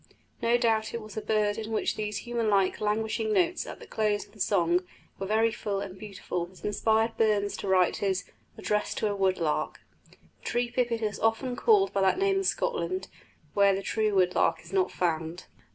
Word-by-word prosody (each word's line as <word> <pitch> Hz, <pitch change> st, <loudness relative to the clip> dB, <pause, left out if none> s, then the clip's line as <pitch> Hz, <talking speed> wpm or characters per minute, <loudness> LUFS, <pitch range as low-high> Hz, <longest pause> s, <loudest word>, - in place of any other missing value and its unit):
No 235 Hz, +1 st, +3 dB
doubt 225 Hz, -2 st, +1 dB
it 230 Hz, -, -3 dB
was 215 Hz, -1 st, -11 dB
a 215 Hz, -, -2 dB
bird 210 Hz, 0 st, +1 dB
in 220 Hz, 0 st, -5 dB
which 220 Hz, -, 0 dB
these 210 Hz, 0 st, -4 dB
human 235 Hz, -2 st, -1 dB
like, 195 Hz, -1 st, +2 dB
languishing 220 Hz, +1 st, 0 dB
notes 350 Hz, +8 st, +1 dB
at -, -, -8 dB
the 465 Hz, -, -11 dB
close 215 Hz, -, 0 dB
of -, -, -23 dB
the 210 Hz, -, -19 dB
song 175 Hz, -3 st, +2 dB, 0.4 s
were 195 Hz, -, -3 dB
very 220 Hz, +2 st, +3 dB
full 200 Hz, -2 st, -3 dB
and 195 Hz, -2 st, -6 dB
beautiful 190 Hz, -3 st, -5 dB
that 185 Hz, 0 st, -13 dB
inspired 220 Hz, +2 st, +1 dB
Burns 210 Hz, -2 st, +2 dB
to -, -, -5 dB
write 185 Hz, -2 st, +3 dB
his 195 Hz, -1 st, 0 dB, 0.3 s
"Address 210 Hz, 0 st, -1 dB
to 215 Hz, -, 0 dB
a -, -, -2 dB
Wood 190 Hz, -1 st, +2 dB
lark." 155 Hz, -3 st, -1 dB, 0.3 s
The -, -, -22 dB, 0.3 s
tree 240 Hz, 0 st, -1 dB
pipit 235 Hz, -2 st, 0 dB
is 210 Hz, -2 st, -2 dB
often 225 Hz, +3 st, 0 dB
called 390 Hz, -, +3 dB
by 195 Hz, -, +1 dB
that 190 Hz, -, +3 dB
name 390 Hz, 0 st, +2 dB
in 390 Hz, -, 0 dB
Scotland, 385 Hz, -3 st, -1 dB, 0.4 s
where 200 Hz, -1 st, +4 dB
the 195 Hz, -, -4 dB
true 215 Hz, -1 st, 0 dB
wood 180 Hz, -1 st, +3 dB
lark 165 Hz, -1 st, +1 dB
is 170 Hz, +2 st, -13 dB
not 190 Hz, -1 st, +2 dB
found. 165 Hz, 0 st, -2 dB
210 Hz, 205 wpm, -28 LUFS, 195-230 Hz, 0.4 s, where